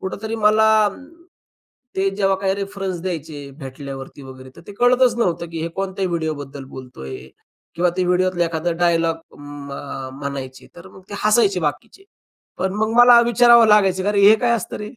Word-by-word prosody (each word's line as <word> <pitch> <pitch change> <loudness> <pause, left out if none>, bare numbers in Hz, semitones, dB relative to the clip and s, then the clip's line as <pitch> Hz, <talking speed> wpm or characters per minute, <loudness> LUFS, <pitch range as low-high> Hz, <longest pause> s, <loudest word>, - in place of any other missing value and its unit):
कुठेतरी 220 +4 -5
मला, 215 0 +4 1.1
ते 195 +1 +1
जेव्हा 195 -1 +1
काही 190 0 -1
रेफरन्स 195 -2 -5
द्यायचे 155 -5 -6
भेटल्यावरती 135 0 -9
वगैरे. 130 0 -12
तर - - -12
ते - - -9
कळतच 245 +2 +3
नव्हतं 175 -6 -1
की 165 -1 -6
हे 165 - -2
कोणत्या 195 0 -3
व्हिडिओबद्दल 150 -5 -4
बोलतो 130 - -11
आहे 65 -1 -8 0.5
किंवा 175 +1 +1
ते 185 - +2
व्हिडिओतला 180 -1 +1
एखादा 170 +1 -2
डायलॉग 165 -1 +1 0.2
म 145 -1 -10 0.5
म्हणायचे. 140 -2 -7
तर 175 - -12
मग 190 - -16
ते - - -6
हसायचे 210 -3 +3
बाकीचे. 150 - -5 0.5
पण 190 0 -1
मग 220 +1 -1
मला 245 -1 +8
विचारावं 235 0 +5
लागायचं. 195 -3 +3
अरे 205 -1 +1
हे 220 - +7
काय 245 - +1
असतं 205 - -6
रे? 210 0 -7
185 Hz, 165 wpm, -20 LUFS, 145-210 Hz, 1.1 s, मला